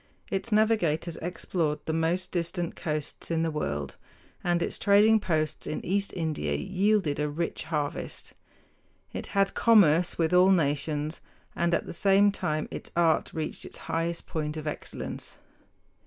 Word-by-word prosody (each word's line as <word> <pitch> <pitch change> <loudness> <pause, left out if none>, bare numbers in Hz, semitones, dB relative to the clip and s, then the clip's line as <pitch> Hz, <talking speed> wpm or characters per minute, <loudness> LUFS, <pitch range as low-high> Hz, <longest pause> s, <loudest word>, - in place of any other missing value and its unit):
Its 195 +4 -2
navigators 180 -7 +2
explored 165 -2 -1
the 160 - -1
most 165 +3 0
distant 170 0 -2
coasts 150 -2 -3
in 165 -1 +1
the 165 - 0
world, 75 - -3 0.5
and 175 -1 +1
its - - -2
trading 210 +2 +5
posts 155 -6 -1
in - - -4
East 200 +2 0
India 160 -4 -1
yielded 195 -5 +1
a 150 0 0
rich 165 +3 -3
harvest. 150 -3 -3 0.8
It - - -5
had 195 0 +3
commerce 180 -7 +4
with 165 +1 +1
all 180 +1 +6
nations, 150 -2 +1 0.3
and 170 0 +1
at - - -2
the - - -7
same 200 +3 +4
time 155 -5 -2
its - - -7
art 170 -2 +2
reached 155 -1 -4
its - - -8
highest 165 +1 -2
point 155 -1 -3
of 155 - -6
excellence. 150 - -5
170 Hz, 150 wpm, -28 LUFS, 155-190 Hz, 0.8 s, all